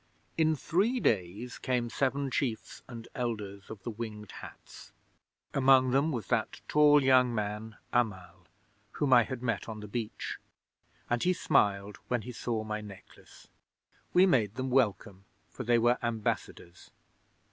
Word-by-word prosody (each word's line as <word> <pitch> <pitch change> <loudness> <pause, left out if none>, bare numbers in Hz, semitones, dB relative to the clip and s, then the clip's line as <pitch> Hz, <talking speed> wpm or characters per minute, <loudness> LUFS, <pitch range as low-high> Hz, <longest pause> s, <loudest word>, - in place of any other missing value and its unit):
'In 160 -1 +3
three 205 - +1
days 105 - -1
came 125 -2 0
seven 135 +2 -1
chiefs 120 -6 -3
and 115 -2 -9
elders 105 -5 -4
of 105 -3 -9
the 120 - -4
Winged 105 -3 -7
Hats. - - -12 0.6
Among 130 -1 +5
them 140 +5 +2
was 120 -6 -3
that 115 -3 0
tall 150 -1 +5
young 130 -2 +4
man, 105 +1 -4 0.2
Amal, 105 -7 -2 0.5
whom 140 -3 +2
I 120 - +8
had 125 +2 -5
met 115 -3 -2
on 110 -1 -6
the 105 - -8
beach, 110 +1 -5 0.7
and 120 -1 0
he 185 - +3
smiled 105 - +1
when 120 -3 -1
he 125 - -7
saw 115 -2 -3
my 110 0 -4
necklace. 100 -3 -14 0.6
We 180 +1 +6
made 115 - +2
them 130 0 -3
welcome, 100 -6 0 0.3
for 130 - -6
they 120 0 +3
were 120 +2 +3
ambassadors. 110 -6 -4
120 Hz, 145 wpm, -30 LUFS, 105-130 Hz, 0.7 s, I